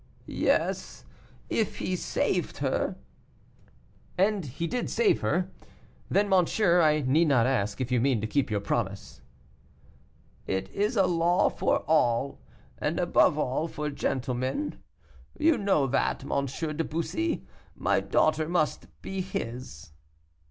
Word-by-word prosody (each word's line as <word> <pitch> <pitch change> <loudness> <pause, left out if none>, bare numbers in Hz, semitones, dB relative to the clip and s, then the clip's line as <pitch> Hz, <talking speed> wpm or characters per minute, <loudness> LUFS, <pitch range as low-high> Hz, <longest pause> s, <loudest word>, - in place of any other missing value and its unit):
"Yes, - - -1 0.4
if 220 - -1
he 185 - -2
saved - - -1
her." - - -1 1.2
"And 195 -1 +2
he 145 +7 -4
did 245 +9 -2
save 440 -5 +2
her. - - 0 0.6
Then, 205 +1 +2
monsieur, 180 -1 +3
I 155 -1 +3
need 150 +5 +3
not 125 -6 +4
ask 105 -6 0
if 130 -1 -3
you 125 -2 +2
mean 130 -3 +2
to 105 - -2
keep 135 +4 0
your 105 -2 -1
promise." 100 -1 -3 1.3
"It 95 0 -2
is 210 +5 0
a 195 -3 +4
law 175 0 +3
for - - +1
all, 140 -4 +2 0.4
and - - -1
above - - +3
all 135 +6 -1
for 150 -2 -4
gentlemen; 130 - -2 0.6
you 320 0 +4
know 195 - +2
that, 135 0 0
M. 140 0 -1
de 155 +4 -3
Bussy. 245 - -2 0.3
My - - +1
daughter 155 0 +1
must 160 -4 0 0.2
be 195 -1 -3
his." 115 - -6
155 Hz, 130 wpm, -28 LUFS, 125-185 Hz, 1.3 s, not